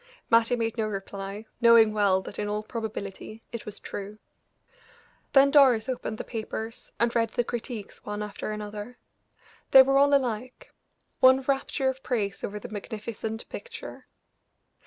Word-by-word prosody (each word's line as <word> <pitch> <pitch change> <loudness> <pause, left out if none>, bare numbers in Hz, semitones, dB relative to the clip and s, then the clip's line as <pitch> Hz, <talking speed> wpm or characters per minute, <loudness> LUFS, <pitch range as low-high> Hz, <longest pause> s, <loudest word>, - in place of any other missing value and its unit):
Mattie 230 +1 +5
made 230 0 -2
no 215 - +1
reply, 195 +1 -6 0.2
knowing 230 -2 +7
well 195 -3 +2
that 205 - -8
in 210 - -1
all 210 +1 -2
probability 215 -1 -6
it 235 -2 -7
was 210 - -6
true. 205 +1 -7 1.2
Then 275 0 +6
Doris 260 -6 +5
opened 245 -4 -3
the - - -4
papers, 225 0 -6
and 235 0 +1
read 230 -1 +2
the 240 - 0
critiques 235 -2 -6
one 210 0 -4
after 210 0 -5
another; 210 +2 -6 0.7
they 265 -1 +10
were 275 +1 +3
all 285 0 +5
alike 250 -2 -3 0.5
one 260 +1 +6
rapture 270 0 0
of 265 0 -1
praise 205 -7 -2
over 210 - -4
the 210 - -7
magnificent 220 +1 -6
picture. 485 - -9
225 Hz, 150 wpm, -27 LUFS, 210-245 Hz, 1.2 s, they